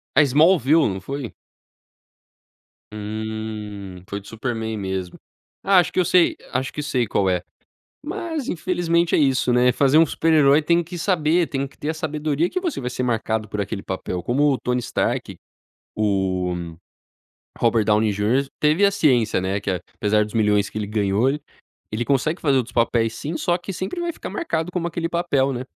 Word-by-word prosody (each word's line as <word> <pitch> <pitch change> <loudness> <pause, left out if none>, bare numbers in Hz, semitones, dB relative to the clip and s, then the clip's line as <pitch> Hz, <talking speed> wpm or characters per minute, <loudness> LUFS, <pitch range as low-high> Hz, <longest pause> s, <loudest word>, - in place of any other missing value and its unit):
A 150 - +7
Smallville, 150 +1 +4
não 95 - -4
foi? 135 +3 -5 1.6
Hum, 105 -2 -6
foi 100 - -3
do 100 - -16
Superman 115 -1 -3
mesmo. 95 -2 -4 0.4
Acho 190 -2 +4
que - - +1
eu 180 - +3
sei 180 -2 +4 0.2
acho 130 +1 -2
que 150 - -4
sei 130 -5 0
qual 100 -2 +1
é, 90 -1 0 0.6
mas 325 -5 -4
infelizmente 170 -1 +1
é - - +3
isso, 135 -4 +2
né, 125 +1 +4
fazer 140 +3 +3
um 165 - +7
super-herói 155 -2 +4
tem 170 +2 +2
que 175 +2 -8
saber, 170 -1 +2
tem 140 -2 -2
que - - -22
ter 150 - -6
a 160 - 0
sabedoria 155 +1 -1
que 370 - -2
você 345 - -3
vai 125 - -3
ser 125 0 -3
marcado 110 -2 -1
por 105 +1 -3
aquele 100 0 -4
papel 90 -1 -4
como 140 +9 +2
o 130 - +1
Tony 125 0 -1
Stark, 120 - -2 0.6
o 95 -4 0 1.0
Robert 115 -2 +2
Downey 105 0 +3
Junior, 110 +7 +1
teve 155 +7 +4
a 200 - +4
ciência, 125 - +2
né. 95 +2 -1
Que 95 - -1 0.2
apesar 105 0 +2
dos 105 - -11
milhões 105 -2 +2
que - - -7
ele 105 -2 -3
ganhou, 105 +3 +1 0.6
ele 115 +2 -2
consegue 140 +5 0
fazer 140 -4 +3
outros 120 -2 -2
papéis, 115 -1 +1
sim. 160 +3 -5
Só, 175 0 +1
que 185 +2 -7
sempre 190 - -4
vai 345 0 -1
ficar - - -7
marcado 170 - -2
como 170 -1 -2
aquele 165 0 -3
papel, 145 -6 +1
né? 125 0 -4
130 Hz, 180 wpm, -22 LUFS, 105-160 Hz, 1.6 s, A